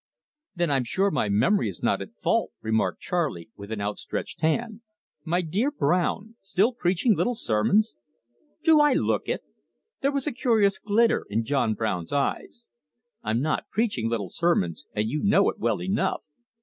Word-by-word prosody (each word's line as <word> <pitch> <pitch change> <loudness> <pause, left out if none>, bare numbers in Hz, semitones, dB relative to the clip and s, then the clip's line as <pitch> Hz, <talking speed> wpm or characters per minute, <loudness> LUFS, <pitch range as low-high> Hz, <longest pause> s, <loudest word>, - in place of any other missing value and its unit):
"Then 170 -3 0
I'm 135 -2 +2
sure 195 +11 +1
my 105 - 0
memory 110 - +2
is 90 - -9
not - - +1
at - - -9
fault," - - +1
remarked 110 0 0
Charley, 150 - -2
with 100 +1 -10
an 110 - -3
outstretched 105 0 -4
hand. 220 +7 0 0.4
"My 175 +2 +1
dear 190 - 0
Brown! 195 - -1
Still 195 +5 +1
preaching 195 +1 +2
little 245 - 0
sermons?" 195 - +2 0.7
"Do 320 -2 +6
I 295 -2 +5
look 110 -1 0
it?" - - -2 0.6
There 275 - +2
was 280 -2 -2
a 300 - 0
curious 225 -6 +2
glitter 225 +2 +2
in 110 +3 0
John 115 -3 +1
Brown's 90 -7 -2
eyes. 145 +11 -2 0.5
"I'm 110 +2 -1
not 155 +2 -1
preaching 200 - 0
little 105 -6 -3
sermons, 95 - 0
and 105 +1 0
you 150 +7 -2
know 200 -1 +4
it - - -17
well 190 - 0
enough." 190 +1 -1
175 Hz, 165 wpm, -26 LUFS, -, 0.7 s, Do